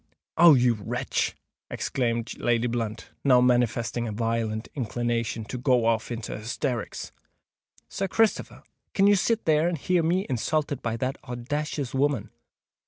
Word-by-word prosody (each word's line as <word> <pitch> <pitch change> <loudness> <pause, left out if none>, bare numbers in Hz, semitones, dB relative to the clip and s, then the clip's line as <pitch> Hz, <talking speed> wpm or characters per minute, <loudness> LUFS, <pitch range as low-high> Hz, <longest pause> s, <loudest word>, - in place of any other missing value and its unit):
"Oh! 170 -2 +8
you 125 -1 +4
wretch!" 105 -3 -2 0.3
exclaimed 115 -3 -2
Lady 120 0 +1
Blunt, 115 -2 -3
now 130 -3 +6
manifesting 120 -1 +1
a - - -3
violent 115 0 -2
inclination 115 -3 -2
to 125 +3 -6
go 125 -2 +2
off 115 0 +1
into 115 -2 -4
hysterics. 115 +2 -4 0.8
"Sir 195 - -3
Christopher! 225 +2 0 0.3
can 195 - +4
you 205 0 +6
sit 225 +3 +1
there 155 +1 +3
and 175 -1 -1
hear 180 +4 +1
me 175 +4 +1
insulted 145 +2 -1
by 115 -1 -2
that 130 +3 -2
owdacious 135 +2 -3
woman? 135 -6 0
125 Hz, 140 wpm, -26 LUFS, 115-145 Hz, 0.8 s, Oh